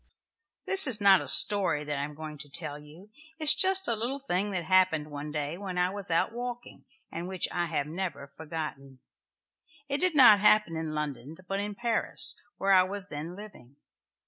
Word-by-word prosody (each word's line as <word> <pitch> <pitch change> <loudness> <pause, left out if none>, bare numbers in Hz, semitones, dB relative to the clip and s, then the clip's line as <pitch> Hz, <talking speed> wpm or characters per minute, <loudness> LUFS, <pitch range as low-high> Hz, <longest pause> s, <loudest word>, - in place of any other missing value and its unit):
This 385 -5 +5
is 235 -5 +4
not 195 -2 +4
a - - -9
story 190 -7 +5
that 145 -1 -5
I - - -3
am 150 +1 -8
going 155 -1 -10
to 145 - -12
tell 150 -2 -4
you. 160 +8 -17 0.3
It 320 - -7
is 300 - +11
just 385 0 +4
a 235 - -1
little 240 +5 -5
thing 205 -7 -4
that 185 -3 -4
happened 170 -5 0
one 145 +1 -8
day 150 +3 -5
when 190 -3 -7
I 180 +1 0
was 200 -1 -2
out 165 +5 -1
walking, 245 +1 -9 0.3
and 170 +2 -7
which 185 -1 -4
I 175 -1 -3
have 155 -3 -3
never 150 -4 -7
forgotten. 150 -4 -8 0.9
It 280 0 -3
did 365 -2 0
not 240 -7 +7
happen 210 -4 +2
in 160 -1 -6
London, 150 0 -7
but 195 0 -4
in 205 0 -6
Paris, 235 0 +1 0.2
where 195 0 0
I 185 - +5
was 195 +2 -5
then 155 +4 -8
living. 195 - -15
180 Hz, 200 wpm, -27 LUFS, 150-210 Hz, 0.9 s, is